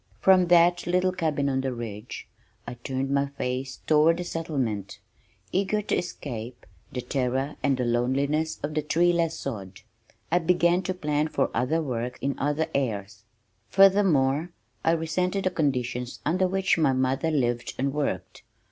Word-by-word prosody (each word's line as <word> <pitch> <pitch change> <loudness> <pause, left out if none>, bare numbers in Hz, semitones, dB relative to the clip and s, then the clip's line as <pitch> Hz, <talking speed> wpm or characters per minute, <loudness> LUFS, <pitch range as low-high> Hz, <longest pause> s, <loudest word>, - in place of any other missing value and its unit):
From 185 +4 +5
that 175 0 +4
little 180 +1 +2
cabin 155 -6 -1
on 135 -1 0
the 135 -1 -2
ridge 110 -1 -7 0.4
I - - -6
turned 130 +3 -3
my 140 0 +2
face 130 -1 -4
toward 165 +3 +3
settlement, 130 - -3 0.5
eager 200 +3 0
to - - 0
escape 120 -8 -5 0.3
the 125 - -3
terror 130 +2 -1
and 140 -2 +2
the 125 - -1
loneliness 140 +6 0
of 150 +1 -2
the 155 - 0
treeless 170 +2 +2
sod. 95 -3 -6 0.5
I 175 - +4
began 175 +1 +3
to 185 - -1
plan 150 -3 0
for - - 0
other 160 +6 0
work 125 -3 -3
in 140 0 -1
other 150 +3 0
airs. 105 -5 -3 0.4
Furthermore, 175 -7 +4 0.3
I 165 - +3
resented 180 +4 -1
the 185 - +1
conditions 125 -6 -1
under 185 +3 +2
which 190 -2 +1
my 145 -4 +3
mother 130 +4 0
lived 120 -6 -1
and 135 +1 -1
worked. 145 -1 -3
145 Hz, 150 wpm, -26 LUFS, 125-170 Hz, 0.5 s, From